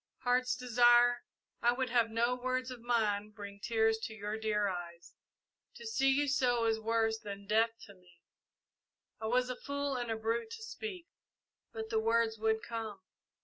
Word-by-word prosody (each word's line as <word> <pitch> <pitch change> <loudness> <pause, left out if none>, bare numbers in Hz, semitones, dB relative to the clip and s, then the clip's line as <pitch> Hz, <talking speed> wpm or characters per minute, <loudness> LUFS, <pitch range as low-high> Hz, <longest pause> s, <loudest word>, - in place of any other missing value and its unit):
"Heart's 250 +1 +2
Desire, 240 0 +4 0.4
I 240 +1 +4
would 255 -1 -2
have 235 -2 +3
no 235 +2 +1
words 255 +1 -2
of 250 -2 -8
mine 215 -3 0
bring 200 -1 -9
tears 225 0 +2
to 220 0 -6
your 210 0 -4
dear 215 -2 0
eyes. 175 -2 -6 0.6
To 470 - -10
see 280 -12 +2
you 285 +2 +2
so 245 -4 +2
is 225 -1 +1
worse 225 0 +1
than 200 -1 -8
death 225 +2 +3
to 200 - -12
me. 180 -2 -23 1.0
I 220 - -2
was 250 +2 +1
a - - -4
fool 280 0 -3
and 240 -1 -3
a 225 - -1
brute 230 - -1
to 450 -1 -8
speak, 430 -5 -6 0.7
but 220 0 -6
the 220 - +2
words 225 0 +1
would 220 0 +1
come. 225 -3 -5
230 Hz, 175 wpm, -33 LUFS, 220-250 Hz, 1.0 s, Desire